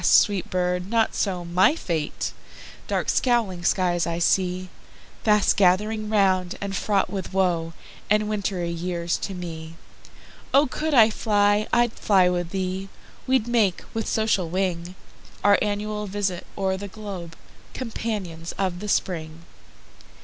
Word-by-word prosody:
sweet 200 Hz, -4 st, +4 dB
bird! 180 Hz, 0 st, -1 dB
not 225 Hz, -1 st, +2 dB
so 180 Hz, -4 st, -1 dB
my 180 Hz, -, +4 dB
fate, 165 Hz, -, -3 dB, 0.5 s
Dark -, -, -1 dB
scowling 225 Hz, -8 st, +1 dB
skies 175 Hz, -1 st, +1 dB
I 170 Hz, 0 st, -2 dB
seeFast 185 Hz, +4 st, 0 dB
gathering 210 Hz, +3 st, +2 dB
round, 190 Hz, -4 st, +2 dB
and 200 Hz, -1 st, -4 dB
fraught 200 Hz, 0 st, 0 dB
with 190 Hz, -2 st, -5 dB
woeAnd 185 Hz, +3 st, -1 dB
wintry 195 Hz, -5 st, -2 dB
years 170 Hz, 0 st, -2 dB
to 195 Hz, -, -5 dB
me.O 165 Hz, -, -4 dB
could 305 Hz, +3 st, -2 dB
I 225 Hz, -2 st, +7 dB
fly, 205 Hz, -1 st, +2 dB
I'd 240 Hz, -1 st, +3 dB
fly 190 Hz, -3 st, +3 dB
with 175 Hz, -1 st, -2 dB
thee:We'd 195 Hz, +6 st, -3 dB
make, 220 Hz, -7 st, +2 dB
with 225 Hz, -1 st, -2 dB
social 215 Hz, -6 st, +1 dB
wing, 180 Hz, -1 st, -2 dB, 0.5 s
Our 205 Hz, 0 st, +5 dB
annual 210 Hz, 0 st, -2 dB
visit 195 Hz, -2 st, -2 dB
o'er 190 Hz, -1 st, 0 dB
the 200 Hz, +1 st, -6 dB
globe, 190 Hz, -5 st, -8 dB, 0.4 s
Companions 205 Hz, -9 st, -4 dB
of 185 Hz, -3 st, -2 dB
the 210 Hz, -, -6 dB
Spring. 165 Hz, -4 st, -2 dB
190 Hz, 125 wpm, -24 LUFS, 175-210 Hz, 0.5 s, I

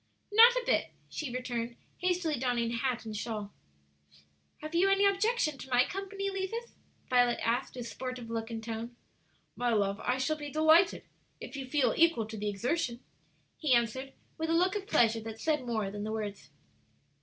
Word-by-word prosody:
"Not 460 Hz, +3 st, +9 dB
a -, -, -1 dB
bit," -, -, +1 dB, 0.2 s
she 300 Hz, -5 st, -4 dB
returned, 240 Hz, -1 st, -3 dB, 0.2 s
hastily 355 Hz, -6 st, 0 dB
donning 240 Hz, -2 st, 0 dB
hat 240 Hz, 0 st, -1 dB
and 215 Hz, -1 st, -5 dB
shawl. 210 Hz, -1 st, -4 dB, 1.1 s
"Have 310 Hz, +1 st, -6 dB
you 360 Hz, +4 st, +4 dB
any 390 Hz, +1 st, +4 dB
objection 395 Hz, -, +1 dB
to 265 Hz, -, -9 dB
my 250 Hz, 0 st, +4 dB
company, 395 Hz, +1 st, -4 dB
Levis?" 390 Hz, +5 st, -4 dB, 0.3 s
Violet 245 Hz, -1 st, +3 dB
asked, 240 Hz, +4 st, 0 dB
with 245 Hz, -2 st, -5 dB
sportive 255 Hz, -1 st, -6 dB
look 225 Hz, 0 st, -3 dB
and 225 Hz, -1 st, -5 dB
tone. 230 Hz, +1 st, -5 dB, 0.6 s
"My 245 Hz, 0 st, 0 dB
love, 200 Hz, -2 st, +1 dB
I 250 Hz, +1 st, 0 dB
shall 285 Hz, +4 st, 0 dB
be 295 Hz, -1 st, -6 dB
delighted, 315 Hz, +4 st, +4 dB, 0.4 s
if -, -, -8 dB
you 270 Hz, -2 st, -5 dB
feel 255 Hz, -4 st, +2 dB
equal 330 Hz, -9 st, +4 dB
to 220 Hz, 0 st, -8 dB
the 210 Hz, 0 st, -2 dB
exertion," 240 Hz, -, -1 dB, 0.6 s
he 290 Hz, -6 st, +4 dB
answered, 250 Hz, +3 st, -1 dB, 0.3 s
with 320 Hz, 0 st, -1 dB
a -, -, +2 dB
look 365 Hz, +4 st, +3 dB
of 400 Hz, -1 st, -4 dB
pleasure 230 Hz, -, +3 dB
that 220 Hz, 0 st, -7 dB
said 300 Hz, -5 st, 0 dB
more 215 Hz, -4 st, -1 dB
than 205 Hz, 0 st, -5 dB
the 215 Hz, -, -3 dB
words. 205 Hz, -10 st, -5 dB
255 Hz, 180 wpm, -31 LUFS, 230-330 Hz, 1.1 s, Not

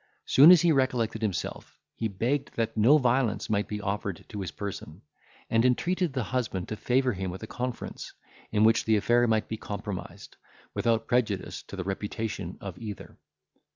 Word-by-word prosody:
Soon 145 Hz, +5 st, +8 dB
as 175 Hz, -2 st, +8 dB
he 170 Hz, -, +5 dB
recollected 125 Hz, -5 st, +1 dB
himself, 105 Hz, -6 st, -4 dB
he 115 Hz, -, -2 dB
begged 125 Hz, +8 st, -2 dB
that 115 Hz, -1 st, -1 dB
no 115 Hz, +8 st, +6 dB
violence 125 Hz, -5 st, +1 dB
might 105 Hz, -1 st, +1 dB
be 105 Hz, -, -4 dB
offered 100 Hz, -3 st, -3 dB
to 105 Hz, -2 st, -5 dB
his 95 Hz, -, -4 dB
person, 95 Hz, -4 st, -7 dB, 0.4 s
and 115 Hz, 0 st, +2 dB
entreated 170 Hz, +7 st, +1 dB
the 130 Hz, -2 st, -2 dB
husband 110 Hz, -6 st, -2 dB
to 110 Hz, -, -3 dB
favour 125 Hz, +3 st, +1 dB
him 95 Hz, -1 st, -3 dB
with 95 Hz, +4 st, -7 dB
a -, -, -3 dB
conference, 125 Hz, +2 st, -5 dB, 0.4 s
in 105 Hz, 0 st, +3 dB
which 115 Hz, +1 st, +4 dB
the 110 Hz, -, +3 dB
affair 120 Hz, +4 st, +3 dB
might 110 Hz, -1 st, +1 dB
be 110 Hz, -, -4 dB
compromised, 100 Hz, -2 st, -7 dB, 0.4 s
without 115 Hz, -1 st, +1 dB
prejudice 110 Hz, -6 st, -1 dB
to -, -, -10 dB
the 95 Hz, -, -3 dB
reputation 100 Hz, -1 st, -4 dB
of 95 Hz, -3 st, -7 dB
either. 105 Hz, -3 st, -8 dB
110 Hz, 175 wpm, -28 LUFS, 100-125 Hz, 0.4 s, Soon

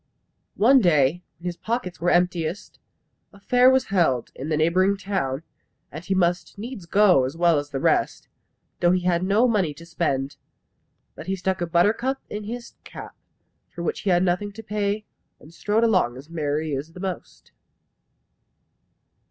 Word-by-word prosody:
One 255 Hz, +5 st, +5 dB
day, 155 Hz, -2 st, +3 dB, 0.2 s
when 170 Hz, -, -16 dB
his 175 Hz, -1 st, -3 dB
pockets 225 Hz, -7 st, -4 dB
were 175 Hz, -, +2 dB
emptiest, 175 Hz, 0 st, -1 dB, 0.5 s
a 200 Hz, -, -17 dB
fair 250 Hz, +5 st, +4 dB
was 260 Hz, 0 st, +3 dB
held 135 Hz, -10 st, +1 dB
in 140 Hz, +4 st, -7 dB
the 155 Hz, -, +1 dB
neighbouring 185 Hz, +5 st, +2 dB
town, 175 Hz, -8 st, -3 dB, 0.5 s
and 155 Hz, +4 st, -8 dB
he 190 Hz, +2 st, -1 dB
must 175 Hz, +1 st, 0 dB
needs 210 Hz, -4 st, -8 dB
go 195 Hz, -8 st, +4 dB
as 135 Hz, +5 st, -4 dB
well 170 Hz, -3 st, +3 dB
as 145 Hz, 0 st, -7 dB
the 135 Hz, -2 st, -4 dB
rest, -, -, 0 dB, 0.5 s
though 175 Hz, -, +3 dB
he 185 Hz, +1 st, +2 dB
had 175 Hz, -1 st, +1 dB
no 205 Hz, +6 st, +3 dB
money 190 Hz, -10 st, 0 dB
to 165 Hz, -, -12 dB
spend. 145 Hz, -5 st, -2 dB, 0.8 s
But -, -, -11 dB
he 190 Hz, -, 0 dB
stuck 190 Hz, 0 st, -2 dB
a 175 Hz, -, -1 dB
buttercup 215 Hz, +11 st, +1 dB
in 210 Hz, 0 st, -5 dB
his 235 Hz, +2 st, -7 dB
cap, -, -, -10 dB, 0.5 s
for 170 Hz, -, -7 dB
which -, -, -2 dB
he 205 Hz, -, -2 dB
had 175 Hz, 0 st, +3 dB
nothing 185 Hz, +3 st, 0 dB
to 225 Hz, +2 st, -10 dB
pay, 210 Hz, 0 st, -2 dB, 0.3 s
and 155 Hz, -, -16 dB
strode 210 Hz, +6 st, 0 dB
along 185 Hz, -, +2 dB
as 145 Hz, +5 st, -13 dB
merrily 155 Hz, -1 st, -2 dB
as 150 Hz, +5 st, -6 dB
the 180 Hz, -, -11 dB
most. 185 Hz, -2 st, -7 dB
180 Hz, 170 wpm, -24 LUFS, 160-205 Hz, 0.8 s, One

